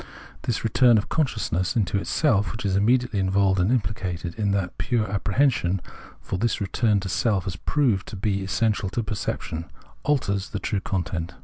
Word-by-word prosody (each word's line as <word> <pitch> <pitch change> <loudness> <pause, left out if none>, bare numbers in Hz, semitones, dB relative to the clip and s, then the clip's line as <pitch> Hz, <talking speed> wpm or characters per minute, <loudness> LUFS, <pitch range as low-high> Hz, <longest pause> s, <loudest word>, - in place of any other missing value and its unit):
This 120 - -2
return 120 +1 +5
of 105 - -1
consciousness 110 - 0
into 100 -3 +1
itself, 105 -3 +1
which 110 - -6
is 95 -1 +1
immediately 115 +1 +2
involved 95 0 +2
and 90 +3 +2
implicated 95 -7 -2
in 105 -2 -1
that 95 -3 -1
pure 120 -4 0
apprehension 100 -2 +1 0.2
— - - -19
for 95 - -3
this 120 +2 0
return 105 +1 +1
to 100 - -4
self 100 +1 +1
has 95 -3 -4
proved 120 - +1
to - - -7
be 100 0 -1
essential 105 0 0
to 115 +4 -2
perception 85 -6 -3 0.2
— - - -28
alters 100 -9 0
the 100 - -3
true 100 - -1
content. 85 -3 -3
100 Hz, 180 wpm, -25 LUFS, 95-115 Hz, 0.2 s, return